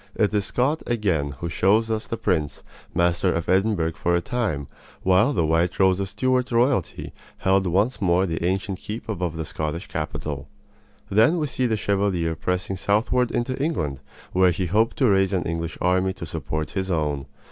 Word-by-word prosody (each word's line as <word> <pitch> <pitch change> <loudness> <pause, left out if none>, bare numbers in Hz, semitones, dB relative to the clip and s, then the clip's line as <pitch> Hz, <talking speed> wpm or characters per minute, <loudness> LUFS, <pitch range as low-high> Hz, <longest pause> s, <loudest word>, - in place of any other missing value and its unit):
It 105 - +1
is 105 -1 +1
Scott 140 +6 0
again 95 -12 0
who 85 - -2
shows 110 +7 +2
us 110 0 -2
the 115 - -3
prince, 75 -8 -1 0.3
master 85 +1 +2
of 85 -1 -2
Edinburgh 95 -3 +2
for 85 +2 0
a - - +3
time, 95 - -2 0.4
while 95 +8 +4
the 85 - +1
white 80 +3 +1
rose 95 -1 +4
of 100 -1 -2
Stuart 130 +2 0
royalty 120 - +1 0.2
held 95 0 +2
once 100 +6 +1
more 90 0 +3
the 80 -2 -3
ancient 95 +1 -1
keep 110 +2 -6
above 90 -6 -3
the 80 - -3
Scottish 75 +3 -4
capital. 70 -2 -4 0.6
Then 110 - +4
we 155 - 0
see 130 -2 -1
the 110 -2 0
Chevalier 95 -5 0
pressing 90 +3 -2
southward 115 +5 +1
into 130 +2 -1
England, 75 - -1 0.3
where 95 0 +5
he 90 +2 -1
hoped 110 +6 +1
to 130 - +3
raise 95 -1 +3
an 90 - +1
English 85 0 -3
army 95 +1 +2
to 95 - -7
support 80 -1 -4
his 95 -1 -2
own. 75 -5 -1
95 Hz, 180 wpm, -24 LUFS, 85-110 Hz, 0.6 s, where